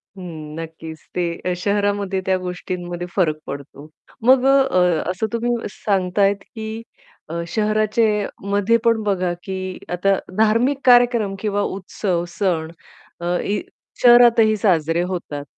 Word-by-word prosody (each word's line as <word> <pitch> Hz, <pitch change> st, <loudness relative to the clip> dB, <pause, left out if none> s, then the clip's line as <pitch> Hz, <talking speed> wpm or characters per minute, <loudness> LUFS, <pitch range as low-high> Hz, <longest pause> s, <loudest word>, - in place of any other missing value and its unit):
हं, 160 Hz, -5 st, -8 dB
नक्कीच. 160 Hz, 0 st, -8 dB, 0.2 s
ते 180 Hz, -, 0 dB, 0.2 s
अ, -, -, +1 dB
शहरामध्ये 200 Hz, -1 st, 0 dB
त्या 190 Hz, -1 st, +2 dB
गोष्टींमध्ये 180 Hz, -1 st, -5 dB
फरक 160 Hz, -5 st, +2 dB
पडतो. 140 Hz, +1 st, -8 dB, 0.4 s
मग 260 Hz, 0 st, +6 dB
अ, -, -, +5 dB, 0.3 s
अ, 180 Hz, -3 st, +3 dB
असं 190 Hz, +4 st, -2 dB
तुम्ही 235 Hz, +1 st, 0 dB, 0.2 s
सांगताहेत, 195 Hz, 0 st, +1 dB, 0.2 s
की 220 Hz, 0 st, -5 dB, 0.5 s
अ, 170 Hz, +1 st, -3 dB
शहराचेमध्ये 215 Hz, 0 st, +1 dB
पण 230 Hz, -1 st, +3 dB
बघा, 185 Hz, -3 st, 0 dB
की 185 Hz, -1 st, -5 dB, 0.2 s
आता 195 Hz, +2 st, +2 dB, 0.2 s
धार्मिक 230 Hz, +6 st, +3 dB
कार्यक्रम 240 Hz, -5 st, +4 dB
किंवा 205 Hz, 0 st, -1 dB
उत्सव, 190 Hz, -2 st, -2 dB
सण 165 Hz, -5 st, 0 dB, 0.5 s
अ, 175 Hz, +1 st, 0 dB
इ 205 Hz, 0 st, -1 dB, 0.4 s
शहरातही 240 Hz, -3 st, +6 dB
साजरे 170 Hz, -5 st, +2 dB
होतात, 145 Hz, -5 st, -5 dB
195 Hz, 125 wpm, -21 LUFS, 175-215 Hz, 0.5 s, मग